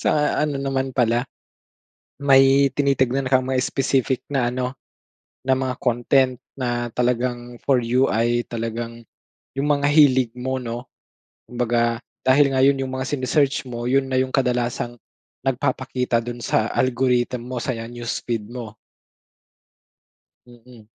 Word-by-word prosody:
Sa - - +2 0.3
ano 150 -2 0
naman 135 -1 -2
pala, 120 0 +2 1.0
may 135 0 +5
tinitignan 135 -2 +1
kang 130 -1 +3
may 130 0 0
specific 130 -1 0
na 135 -4 +1
ano, 125 +1 -3 0.7
na 130 0 +2
mga 130 -1 -2
content 125 +1 +2 0.2
na 120 -2 -2
talagang, 120 0 -1
for 130 -4 +3
you 125 +3 +2
ay 120 +2 +1
talagang, 115 0 -5 0.5
yung 135 +2 -1
mga 145 -1 +2
hilig 130 -6 +5
mo 130 +1 -3
'no. 120 0 -6 0.6
Kumbaga, 120 -1 0 0.2
dahil 140 +2 +6
nga 130 -1 +1
yon 135 -1 +3
yung 130 - -3
mga 130 0 -3
sine-search 135 +1 +1
mo, 120 0 -4
yun 135 +1 +1
na 130 - +1
yung 130 0 -1
kadalasang, 120 -2 -1 0.5
nagpapakita 130 -1 0
dun 120 +1 -5
sa 110 - +1
algorithm 125 -1 +1
mo 125 -2 -4
sa 130 - -1
newsfeed 115 -1 -4
mo. 120 -4 -7 1.7
Mm. 120 -2 -17
125 Hz, 130 wpm, -22 LUFS, 120-135 Hz, 1.7 s, dahil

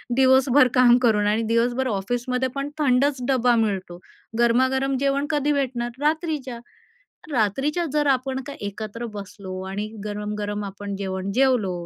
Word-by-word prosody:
दिवसभर 260 0 +5
काम 245 -1 +6
करून 210 -3 +3
आणि 215 +2 +1
दिवसभर 245 +3 +1
ऑफिसमध्येपण 250 +6 -2
थंडच 275 -1 +2
डबा 250 -3 +3
मिळतो, 185 -4 -4 0.4
गरमागरम 260 +3 +2
जेवण 280 +1 +1
कधी 295 -1 +1
भेटणार? 250 -4 -1
रात्रीच्या. 300 -5 -1 0.7
रात्रीच्या 270 - 0
जर 295 -1 +2
आपण 265 0 0
का 285 - -6
एकत्र 215 +3 -5
बसलो 190 -2 -7
आणि 205 +2 -4 0.2
गरम-गरम 210 0 -4
आपण 200 0 -6
जेवण 190 0 -4
जेवलो 250 -8 +3
245 Hz, 125 wpm, -23 LUFS, 205-270 Hz, 0.7 s, काम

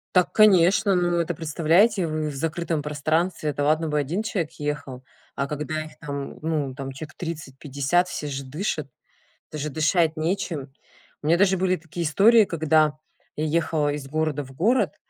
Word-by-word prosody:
Так 180 - +3
конечно, 200 0 +5
ну 175 -1 +1
это 170 +1 -2
представляете 170 +6 +2
вы 155 -1 -2
в 145 - -7
закрытом 160 +1 -2
пространстве. 155 +3 -1
Это 145 - -2
ладно 155 +2 +2
бы 150 - -1
1 160 +9 -1
человек 185 -7 -2
ехал, 145 -3 -4 0.3
а 140 - -1
когда 150 +2 -3
их 155 - -14
там 140 -2 -6
ну 150 -4 -2
там 135 -1 -6
человек 155 +3 -9
30-50 150 +1 -2
все 150 - -4
же 140 -1 -4
дышат, 150 +1 -3 0.6
это 155 - -5
же 150 - -2
дышать 160 +2 +1
нечем. 155 -5 -2 0.5
У 150 - -4
меня 170 +2 +4
даже 190 0 +3
были 185 0 +2
такие 170 0 -6
истории 215 +7 +6
когда 155 -2 +2 0.4
я 155 - -1
ехала 155 -2 0
из 145 -2 -6
города 155 0 -1
в 135 - -13
город, 215 - +1
155 Hz, 170 wpm, -24 LUFS, 145-175 Hz, 0.6 s, истории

